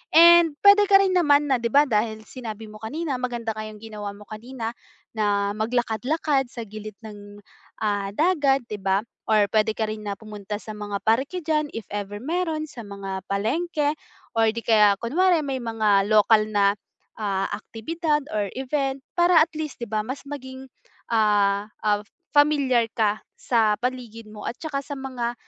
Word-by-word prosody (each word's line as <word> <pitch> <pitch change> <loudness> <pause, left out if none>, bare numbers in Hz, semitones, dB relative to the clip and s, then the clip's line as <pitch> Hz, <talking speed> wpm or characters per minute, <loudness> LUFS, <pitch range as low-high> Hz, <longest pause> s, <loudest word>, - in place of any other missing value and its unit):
And, 340 +1 +9 0.2
pwede 405 +1 +8
ka 390 0 +7
rin 380 - +1
naman 295 -3 +4
na 260 - +3
di 235 - -1
ba 285 - +6
dahil 220 -1 -1
sinabi 225 -4 -7
mo 215 - -12
kanina 275 +4 -3
maganda 240 -2 -3
nga 215 0 -5
yong 215 -1 -11
ginawa 210 -2 -6
mo 205 - -13
kanina, 230 +1 -6 0.4
na 205 -1 0
maglakad-lakad 245 +5 0
sa 235 - -5
gilid 215 +1 -8
ng 205 -1 -11 0.4
ah, 205 -2 -1
dagat 290 - +2
di 210 - -3
ba 195 0 +1 0.3
or 215 -2 +5
pwede 220 0 +3
ka 220 - +1
rin 215 0 -5
na 200 - -2
pumunta 210 -1 -7
sa - - -13
mga 205 -1 -4
parke 265 +11 +1
diyan 305 -2 0
if 225 -3 -6
ever 205 0 -5
meron, 320 +1 -2
sa 255 -5 -9
mga 195 -1 -6
palengke 290 - 0 0.4
or 225 -1 +4
di 230 - -4
kaya 210 -3 +5
kunwari 335 +8 +2
may 270 -1 -2
mga 215 -4 +2
lokal 215 0 +5
na, 200 -1 +3 0.4
ah, 195 -2 -1
aktibidad 295 +9 -2
or 205 -2 -1
event, 270 0 -2 0.2
para 345 0 +5
at 320 - +3
least 310 -3 -4
di - - -2
ba 215 0 0
mas 260 +3 -5
maging, 260 -2 -8 0.5
ah, 205 -1 +2 0.2
ah, 205 -1 +2 0.3
pamilyar 280 -6 +3
ka 215 -1 +1 0.2
sa 220 -4 +2
paligid 240 -3 -4
mo 210 0 -10
at 235 - -7
saka 295 -4 -3
sa 290 - -6
mga, 250 -3 -3
225 Hz, 170 wpm, -24 LUFS, 210-285 Hz, 0.5 s, And